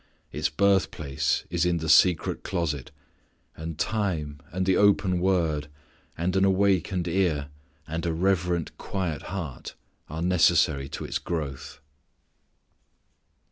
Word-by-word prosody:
Its - - -1
birthplace 75 -6 +1
is 85 -1 +1
in 90 -1 +2
the 80 -1 -4
secret 85 +1 +4
closet; 75 -6 -2 0.7
and 80 0 -6
time 80 -10 -2
and 95 +1 -1
the 95 -1 +3
open 100 -3 +3
Word, 85 -5 +1 0.5
and 90 +3 -1
an 95 - +3
awakened 95 -2 +2
ear 80 -5 0 0.4
and 80 +1 -3
a - - +1
reverent 90 -1 0
quiet 90 -7 -3
heart 85 -9 -6 0.3
are 80 +2 -4
necessary 85 -6 +3
to - - -6
its - - -2
growth. 75 -7 -5
85 Hz, 120 wpm, -26 LUFS, 75-95 Hz, 0.7 s, secret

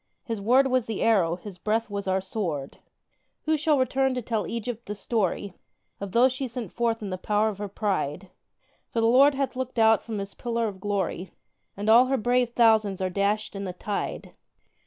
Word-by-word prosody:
His 225 -4 -4
word 250 +6 +4
was 255 -3 +1
the 220 -3 -2
arrow, 185 -7 +3
His 185 0 -10
breath 220 +4 0
was 200 -1 -5
our 190 0 +1
sword! 175 -8 -4 0.6
Who 315 0 +2
shall 305 -1 +2
return 265 0 +1
to 250 - -2
tell 215 -5 -2
Egypt 235 0 -5
the 210 - -4
story 200 -2 -1 0.5
Of 200 -1 -6
those 245 +4 +4
she 260 0 -3
sent 235 -5 -6
forth 230 -2 -1
in 200 - -4
the 185 - -4
power 210 +2 +1
of 200 -2 -7
her 205 - -3
pride? 190 -4 -2 0.6
For 230 - -2
the 225 - +2
Lord 270 +5 +6
hath 275 -1 -2
looked 255 -1 -4
out 225 -1 +5
from 225 -2 -5
His 200 0 -5
pillar 235 -2 -2
of 195 -3 -7
glory, 195 -2 -2 0.5
And 205 +1 -4
all 235 +3 +7
her 270 +1 +1
brave 245 +1 +1
thousands 220 -5 +3
are 185 -1 -1
dashed 205 +3 -1
in 200 - -4
the 180 - -4
tide. 200 +3 -4
220 Hz, 200 wpm, -26 LUFS, 200-245 Hz, 0.6 s, all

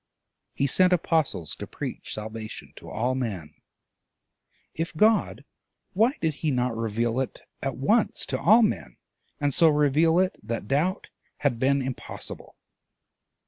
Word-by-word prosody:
He 140 - +1
sent 180 +6 +4
apostles 160 - 0
to - - -7
preach - - -6
salvation 110 0 -7
to - - -11
all 120 +4 -1
men: 105 - -4 1.2
if 165 0 -4
God, 215 +3 +2 0.5
why 225 +7 +3
did 160 -2 0
he 155 - +1
not 125 -3 0
reveal 115 +2 -1
it 135 - -3 0.2
at 135 -2 -3
once 210 - +2
to - - -3
all 220 +6 +6
men, 75 - -1 0.4
and 145 -1 +1
so 165 +3 +5
reveal 150 +2 +3
it 185 0 +1
that 110 -1 -4
doubt 160 - 0 0.3
had 130 -5 +1
been 135 +1 +2
impossible? 130 -1 -6
140 Hz, 140 wpm, -26 LUFS, 115-165 Hz, 1.2 s, all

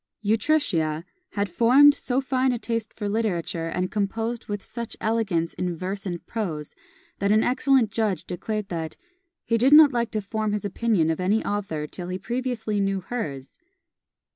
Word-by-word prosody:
Utrecia 205 - +1 0.3
had 200 0 0
formed 250 +10 +6
so 260 -1 -1
fine 260 -1 +1
a 245 - -1
taste 230 -1 -3
for 210 - -5
literature, 180 -6 -1
and 180 +2 -2
composed 225 +3 -2
with 205 -1 -4
such 235 0 -6
elegance 210 -7 0
in 180 -1 -2
verse 195 +3 -4
and 175 -2 -5
prose, 165 -10 -4 0.5
that 200 0 +1
an 215 +1 +4
excellent 260 -3 +3
judge 210 -6 -1
declared 205 +3 -4
that 165 -2 -4 0.5
"he 230 -1 +1
did 265 +5 +5
not 300 -2 +9
like 235 -1 0
to 215 - -2
form 215 +1 -2
his 210 -1 -2
opinion 200 -5 +1
of 160 - -3
any 200 +5 +1
author 195 -7 -2
till 175 +3 -7
he 180 0 -3
previously 230 0 -2
knew 195 -1 0
hers." 165 - -5
210 Hz, 165 wpm, -25 LUFS, 180-230 Hz, 0.5 s, not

